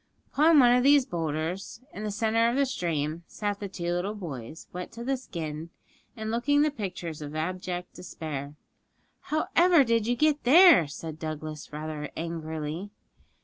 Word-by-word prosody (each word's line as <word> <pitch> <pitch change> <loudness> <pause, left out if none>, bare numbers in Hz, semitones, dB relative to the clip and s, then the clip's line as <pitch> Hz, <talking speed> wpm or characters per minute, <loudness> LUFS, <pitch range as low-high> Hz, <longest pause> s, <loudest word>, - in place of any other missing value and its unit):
Upon 315 +2 +5
one 245 -3 +7
of 250 - +4
these 280 0 +5
boulders, 165 - -3
in 210 - -6
the 215 - -2
centre 225 +2 +2
of 240 - -1
the 280 0 +3
stream, 165 - -2
sat 205 -1 -3
the 205 - -4
two 175 -2 -3
little 190 +4 -2
boys, 155 - -7
wet 180 0 -6
to 235 - -7
the 270 +2 0
skin, 165 - -6 0.5
and 220 0 -3
looking 285 +5 +2
the 305 - +2
pictures 180 - -5
of 150 +1 -7
abject 180 +2 -4
despair. 150 -5 -6 0.6
'However 330 +1 +3
did 230 -3 +1
you 245 - +2
get 300 +2 +2
there?' 315 - +7
said 155 +1 -7
Douglas 155 -1 -6
rather 150 0 -5
angrily. 160 +2 -4
180 Hz, 160 wpm, -27 LUFS, 155-240 Hz, 0.6 s, one